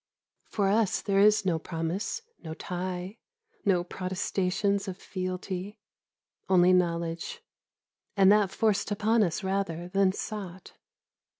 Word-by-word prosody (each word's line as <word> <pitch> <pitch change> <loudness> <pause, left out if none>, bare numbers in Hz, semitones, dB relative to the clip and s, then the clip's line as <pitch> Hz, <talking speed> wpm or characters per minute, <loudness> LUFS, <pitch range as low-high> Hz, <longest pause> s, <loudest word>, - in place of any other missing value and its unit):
For 200 -2 0
us 210 0 +2
there 195 -1 +1
is 210 0 +5
no 170 -3 +1
promise, 170 - -3 0.2
no 160 -1 -6
tie, 180 +4 -5 0.5
no 180 -3 +3
protestations 190 +2 -1
of 185 -1 -5
fealty; 185 +2 -5 0.7
only 180 -1 +5
knowledge, 170 -2 -1 0.7
and 195 0 +7
that 210 -2 +4
forced 215 0 +1
upon 215 +2 +2
us 185 0 0
rather 190 -3 -2
than 195 0 +3
sought. 190 -2 -7
190 Hz, 115 wpm, -28 LUFS, 180-200 Hz, 0.7 s, and